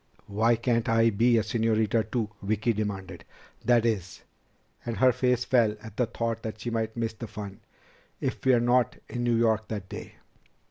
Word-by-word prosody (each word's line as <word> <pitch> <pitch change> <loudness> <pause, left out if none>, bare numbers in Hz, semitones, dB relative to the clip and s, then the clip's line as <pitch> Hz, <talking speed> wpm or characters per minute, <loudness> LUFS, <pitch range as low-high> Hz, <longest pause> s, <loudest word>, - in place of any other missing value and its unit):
"Why 110 +3 +2
can't 115 +1 0
I 115 0 +4
be 115 +3 +3
a 110 - +2
señorita 110 0 +1
too?" 110 -4 -1
Vicki 110 +3 0
demanded. 100 -3 -4 0.4
"That 120 -1 +4
is" 100 -6 -2 0.6
and 115 -2 -4
her 130 +5 +5
face 125 0 +1
fell 115 -5 +3
at 110 +1 -11
the 125 - +1
thought 115 0 -3
that 110 -1 -6
she 120 - -3
might 110 0 -2
miss 115 -1 -1
the 115 +1 -7
fun 105 -1 -8 0.6
"if - - -3
we're 130 -2 +5
not 120 +1 +2
in 120 - -4
New 120 -1 +2
York 110 -2 +2
that 100 -4 -5
day." - - -8
115 Hz, 180 wpm, -27 LUFS, 110-120 Hz, 0.6 s, her